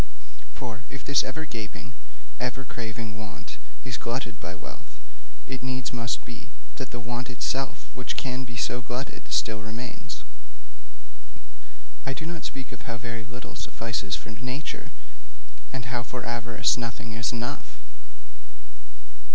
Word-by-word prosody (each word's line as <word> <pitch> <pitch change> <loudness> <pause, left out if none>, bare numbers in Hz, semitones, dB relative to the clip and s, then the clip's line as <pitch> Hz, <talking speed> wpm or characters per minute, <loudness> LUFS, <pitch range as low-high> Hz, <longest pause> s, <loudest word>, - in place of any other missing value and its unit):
For 115 -2 -2
if 135 - -5
this 140 - +8
ever 160 +5 0
gaping, 105 - -3 0.5
ever 130 +1 +2
craving 115 -2 -2
want 110 -2 -5 0.3
is 125 -2 +2
glutted 120 -1 +1
by 85 +2 -2
wealth, 65 -6 -8 0.5
it 130 - -1
needs 130 0 +1
must 120 0 +2
be 115 -1 -6 0.3
that - - 0
the 120 - -2
want 120 +2 0
itself 130 +2 +2
which 125 - 0
can 130 0 +2
be 120 -1 -5
so 125 - +4
glutted 125 +3 -2
still 110 -1 +5
remains. 115 +3 -3 1.8
I 135 - +2
do 160 - -2
not 170 -1 -1
speak 135 -2 -2
of 120 +1 -5
how 115 - +1
very 115 -1 -1
little 125 +1 -5
suffices 115 - +2
for - - -4
nature, 125 +7 -1 0.8
and 130 -2 -1
how 125 -2 +2
for 125 +1 -2
avarice 120 0 +5
nothing 115 -1 -1
is 115 0 +4
enough. 120 0 -1
120 Hz, 140 wpm, -31 LUFS, 115-130 Hz, 1.8 s, this